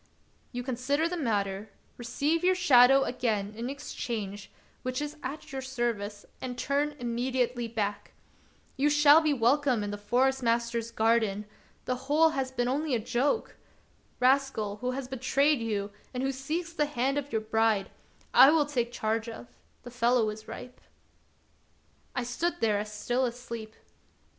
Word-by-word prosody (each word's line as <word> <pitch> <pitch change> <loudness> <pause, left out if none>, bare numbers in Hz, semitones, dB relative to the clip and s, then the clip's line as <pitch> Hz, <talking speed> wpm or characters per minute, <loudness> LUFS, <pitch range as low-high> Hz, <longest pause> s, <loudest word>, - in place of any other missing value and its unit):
You 245 0 -4
consider 265 +5 0
the 355 - -3
matter, 205 - -1 0.3
receive 295 +7 -1
your 370 +1 +4
shadow 270 -6 +6
again 215 -6 -1
in 235 +3 -4
exchange, 225 -7 -5 0.3
which 255 0 -2
is 295 +1 -4
at 275 +4 -6
your 265 -1 -4
service, 235 -6 -3 0.2
and 250 -1 -5
turn 285 +3 0
immediately 245 0 -1
back. 205 -3 -3 0.6
You 285 +2 +3
shall 295 +1 +7
be 310 -1 +2
welcome 255 -2 +2
in 205 - -3
the 205 - -5
Forest 260 +6 +1
master's 235 -1 0
garden; 220 -3 +1 0.4
the 255 - 0 0.2
whole 320 +2 +5
has 270 -4 -2
been 245 -2 -1
only 280 +1 0
a - - 0
joke. 245 - -1 0.6
Rascal, 255 -5 +2
who 250 +4 -3
has 255 0 -3
betrayed 270 +3 +2
you, 210 -3 -2 0.2
and 250 - -1
who 270 - +1
seeks 315 +6 -4
the 300 -3 +1
hand 275 0 0
of 285 0 -8
your 220 - 0
bride, 220 -2 +1 0.4
I 270 - +9
will 305 -1 +4
take 245 -5 -1
charge 225 0 -1
of; 120 - -9 0.3
the 245 - -9
fellow 240 -2 +2
is 215 +1 -10
ripe." 250 0 -9 1.3
I 250 - 0
stood 340 +9 -2
there 210 -2 +2
as 210 0 -5
still 240 +5 -1
asleep. 235 -3 -5
245 Hz, 155 wpm, -29 LUFS, 225-275 Hz, 1.3 s, I